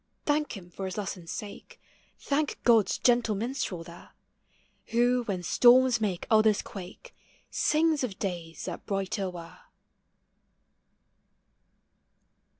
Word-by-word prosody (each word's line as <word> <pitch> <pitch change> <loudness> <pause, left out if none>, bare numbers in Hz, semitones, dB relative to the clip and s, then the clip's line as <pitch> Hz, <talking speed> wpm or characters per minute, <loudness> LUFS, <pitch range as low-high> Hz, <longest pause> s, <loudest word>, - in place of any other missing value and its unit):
Thank 295 -5 0
him 175 -2 -13
for 195 - -6
his 190 +1 -5
lesson's 185 -4 -5
sake, 205 -1 -8 0.4
Thank 290 +1 -1
God's 230 -4 +4
gentle 240 -3 +2
minstrel 215 -6 -3
there, 170 +1 -13 0.8
Who, 245 +1 +2
when 185 -4 -3
storms 245 +4 +5
make 190 -5 -1
others 215 -2 +4
quake, 195 - -10 0.4
Sings 310 -2 +2
of 205 -7 -3
days 170 -4 -5
that - - -7
brighter 195 -1 -2
were. 170 -2 -10
210 Hz, 110 wpm, -28 LUFS, 185-245 Hz, 0.8 s, storms